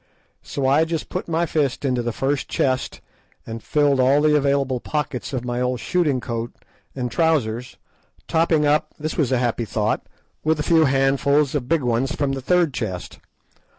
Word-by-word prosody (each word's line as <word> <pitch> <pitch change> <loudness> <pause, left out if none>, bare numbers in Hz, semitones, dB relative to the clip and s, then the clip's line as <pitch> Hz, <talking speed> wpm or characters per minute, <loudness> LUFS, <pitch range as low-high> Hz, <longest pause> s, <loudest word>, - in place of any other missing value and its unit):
So 140 - -4
I 140 +4 +4
just 160 -1 -3
put 185 - -4
my 165 +1 +1
fist 145 -4 -1
into 125 -2 +1
the 120 0 -2
first 135 +4 -1
chest 130 -1 -1 0.4
and 115 0 -6
filled 145 0 +2
all 130 +3 +4
the 150 0 +4
available 140 -3 +1
pockets 150 -3 -3
of 125 -3 -3
my 120 0 -2
old 125 -1 0
shooting 155 -6 +1
coat 115 -1 -4 0.4
and 125 -3 -3
trousers, 125 -8 0 0.5
topping 160 -2 +2
up—this 150 +1 0
was 140 -6 0
a 130 - +3
happy 120 -1 0
thought—with 115 +8 -2
a - - 0
few 160 0 +4
handfuls 140 +1 +2
of 135 -4 -2
big 165 -4 +2
ones 125 +4 0
from 140 -2 0
the 135 -1 -3
third 175 0 +2
chest. 95 -8 -5
135 Hz, 170 wpm, -22 LUFS, 125-150 Hz, 0.5 s, I